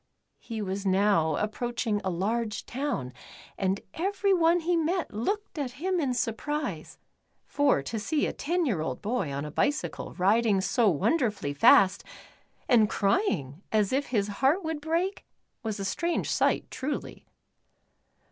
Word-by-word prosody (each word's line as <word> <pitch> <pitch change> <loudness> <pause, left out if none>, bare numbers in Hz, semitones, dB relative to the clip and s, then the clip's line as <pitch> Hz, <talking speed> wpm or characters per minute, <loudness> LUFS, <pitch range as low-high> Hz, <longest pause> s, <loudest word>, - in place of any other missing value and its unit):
He 225 -3 -5
was 195 0 -3
now 190 -4 +3
approaching 220 0 -2
a 190 - -1
large 210 +4 -2
town 245 - -3 0.4
and 195 0 -1
every 395 +3 +1
one 340 -1 +3
he 345 +2 +1
met 335 - 0
looked 395 - -3
at 260 -4 -3
him 360 +7 -1
in 265 -5 0
surprise, 240 - -3 0.5
for 285 - +2
to 225 +9 -4
see 285 +8 0
a - - -2
ten 345 +3 -1
year 205 - 0
old 130 -5 -3
boy 215 - -1
on 140 +1 -3
a 150 - -6
bicycle 290 - -1
riding 205 +2 +3
so 220 +3 +2
wonderfully 200 - 0
fast, 185 +6 +5 0.6
and 220 -4 +5
crying 195 - 0
as 215 0 +2
if 280 +2 0
his 210 -5 0
heart 300 +8 +3
would 320 -2 -3
break, 335 +5 -1 0.4
was 220 -4 -4
a 195 - -3
strange 335 - -1
sight - - +1
truly. 285 +3 -5
230 Hz, 145 wpm, -28 LUFS, 195-305 Hz, 0.6 s, fast